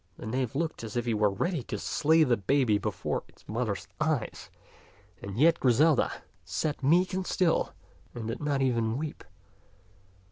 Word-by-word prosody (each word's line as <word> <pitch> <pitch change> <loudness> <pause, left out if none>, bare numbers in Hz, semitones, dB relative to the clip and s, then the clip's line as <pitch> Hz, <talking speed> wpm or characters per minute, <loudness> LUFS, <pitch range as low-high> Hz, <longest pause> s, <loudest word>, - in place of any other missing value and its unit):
The - - -9
knave 125 +2 -2
looked 160 -3 -2
as 115 +1 -5
if 120 - -1
he 120 - +1
were 105 -1 +3
ready 160 - -1
to - - -4
slay 160 +2 +3
the 125 -5 +3
baby 115 0 +2
before - - -2
its - - -24
mother's 110 -3 -2
eyes; 150 -6 -1 0.7
and 100 +1 -6
yet 165 +6 +5
Griselda 140 +3 +4 0.3
sat 150 -3 -2
meek 175 +8 +3
and 185 0 -2
still, 180 -4 +1 0.4
and 115 -2 -5
did 115 - -4
not 145 -2 0
even 115 -3 +1
weep. 150 +1 -5
130 Hz, 165 wpm, -29 LUFS, 115-155 Hz, 0.7 s, yet